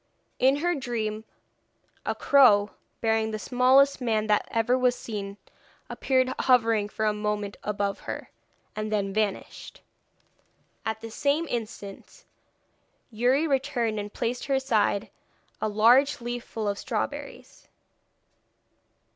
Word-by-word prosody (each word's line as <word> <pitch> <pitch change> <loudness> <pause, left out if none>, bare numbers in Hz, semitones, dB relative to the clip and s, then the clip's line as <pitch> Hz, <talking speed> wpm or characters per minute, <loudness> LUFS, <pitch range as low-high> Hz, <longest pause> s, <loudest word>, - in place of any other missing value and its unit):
In 265 +2 +4
her 350 +5 0
dream 225 -6 -3 0.8
a - - 0
crow, 210 -8 +5 0.3
bearing 220 -1 +1
the 215 - -3
smallest 260 +4 +3
man 220 -3 0
that 210 -1 +1
ever 230 +2 +1
was 250 -1 +2
seen, 200 -4 -6 0.5
appeared 260 -1 +1
hovering 225 -5 +3
for 215 - -2
a 210 - +2
moment 210 -1 -3
above 200 -1 -2
her, - - -7 0.4
and 215 0 -4
then 200 -2 -1
vanished. 210 -2 -3 1.0
At 220 0 -3
the 225 - -8
same 285 +7 0
instant 225 - -7 0.9
Youri 250 +7 +2
returned 265 -6 0
and 205 0 -6
placed 240 +4 -3
by 275 - +1
her - - +2
side 215 -6 0 0.5
a - - +1
large 240 +7 +4
leaf 240 0 -4
full 220 -2 -4
of 200 0 -2
strawberries. - - -5
225 Hz, 125 wpm, -26 LUFS, 210-255 Hz, 1.0 s, crow